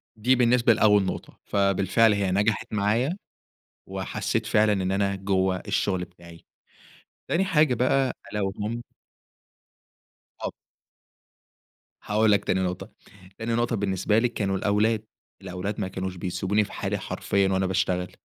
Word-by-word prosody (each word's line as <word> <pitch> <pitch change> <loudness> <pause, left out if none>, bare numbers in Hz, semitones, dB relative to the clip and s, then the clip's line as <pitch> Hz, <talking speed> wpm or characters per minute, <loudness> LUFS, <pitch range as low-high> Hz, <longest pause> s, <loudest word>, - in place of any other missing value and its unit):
دي 125 +4 +3
بالنسبة 120 -1 +4
لأول 105 -2 +4
نقطة. - - -6
فبالفعل 100 +2 +3
هي 100 -2 0
نجحت 105 +2 0
معايا، 115 - +1 0.7
وحسّيت - - -2
فعلًا 105 0 +3
إن 95 -1 0
أنا 100 0 0
جوّه 95 -1 0
الشغل 95 -3 0
بتاعي. 85 -2 -16 0.8
تاني 185 +3 +2
حاجة 155 -8 +3
بقى 130 +2 +2 0.2
ألا 105 - -2
وهم 105 +4 -3 1.6
طب - - -4 1.5
هاقول 110 +1 +2
لك 100 - +2
تاني 95 - +1
نقطة. 90 -1 -3 0.5
تاني 115 +1 -2
نقطة 120 0 0
بالنسبة 100 +2 +1
لي 125 - +2
كانوا 100 -4 -1
الأولاد. 105 +2 +1 0.4
الأولاد 95 +3 -5
ما 95 - -1
كانوش 95 0 -5
بيسبوني 95 +4 0
في - - -9
حالي - - -2
حرفيًا 100 -1 0
وأنا 95 0 +1
باشتغل. 90 -1 0
100 Hz, 130 wpm, -25 LUFS, 95-110 Hz, 1.6 s, بالنسبة